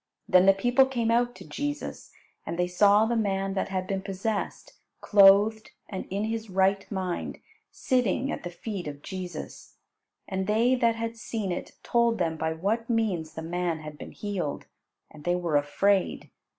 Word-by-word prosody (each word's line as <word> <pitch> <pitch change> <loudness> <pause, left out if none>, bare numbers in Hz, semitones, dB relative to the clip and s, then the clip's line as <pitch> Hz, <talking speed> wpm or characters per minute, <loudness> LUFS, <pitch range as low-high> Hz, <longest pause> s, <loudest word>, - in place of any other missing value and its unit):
Then 185 +1 +5
the 195 - +8
people 245 +7 +3
came 235 -4 0
out 240 +1 +2
to - - -12
Jesus, 290 0 -5 0.3
and 170 - -5
they 180 - +2
saw 200 +4 +4
the 235 +1 0
man 195 -3 0
that 195 - -2
had 185 -1 -2
been 195 0 -2
possessed, 200 +2 -3 0.3
clothed 205 +2 +5 0.2
and 190 -3 -5
in 200 +2 -2
his 225 0 -3
right 195 +2 +1
mind, 185 -3 -3 0.3
sitting 255 +2 0
at - - -4
the 175 - -5
feet 185 0 -6
of 145 -1 -7
Jesus. 185 -2 -7 0.5
And 190 -1 -2
they 225 +4 +3
that 235 -3 +2
had 230 0 -4
seen 220 -4 -3
it 175 - -5
told 235 -1 +2
them 165 -3 0
by 160 0 -1
what 210 +9 -1
means 190 -9 0
the 160 - -5
man 170 -1 -2
had 150 -1 -9
been - - -8
healed, 195 -8 -4 0.5
and 155 -1 -13
they 175 0 +1
were 175 -4 -1
afraid. 185 +7 +1
195 Hz, 175 wpm, -27 LUFS, 180-225 Hz, 0.5 s, the